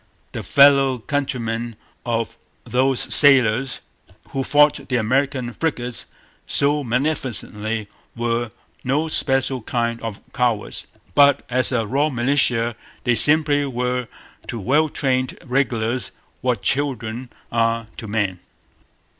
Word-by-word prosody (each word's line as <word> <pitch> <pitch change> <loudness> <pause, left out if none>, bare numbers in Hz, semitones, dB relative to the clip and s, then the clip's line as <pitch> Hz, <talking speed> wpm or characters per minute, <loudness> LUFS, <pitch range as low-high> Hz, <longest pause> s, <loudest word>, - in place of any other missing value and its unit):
The - - -5
fellow 140 -2 +4
countrymen 120 -3 -3 0.3
of 115 -1 -2 0.3
those 130 +1 +1
sailors 130 -2 +5 0.5
who 135 -1 -3
fought 150 +1 +2
the 125 - 0
American 130 +1 0
frigates 125 -7 -3 0.4
so 145 +1 +1
magnificently 115 -5 -2 0.3
were 120 0 -2 0.3
no 145 +5 0
special 135 -3 +2
kind 115 0 -2
of 110 -2 -6
cowards. 120 -4 -1 0.3
But, 140 -1 +4
as 130 +2 +3
a 115 -3 0
raw 140 +7 0
militia, 120 -3 +1 0.3
they 125 - +2
simply 145 +4 +3
were 125 -1 -2 0.4
to 115 - -5
well 145 +10 +1
trained 130 -3 -1
regulars 125 -3 -1 0.3
what 120 -6 -1
children 125 -2 -2 0.2
are 115 0 0
to 110 - -7
men. 100 -4 -2
125 Hz, 115 wpm, -21 LUFS, 115-140 Hz, 0.5 s, sailors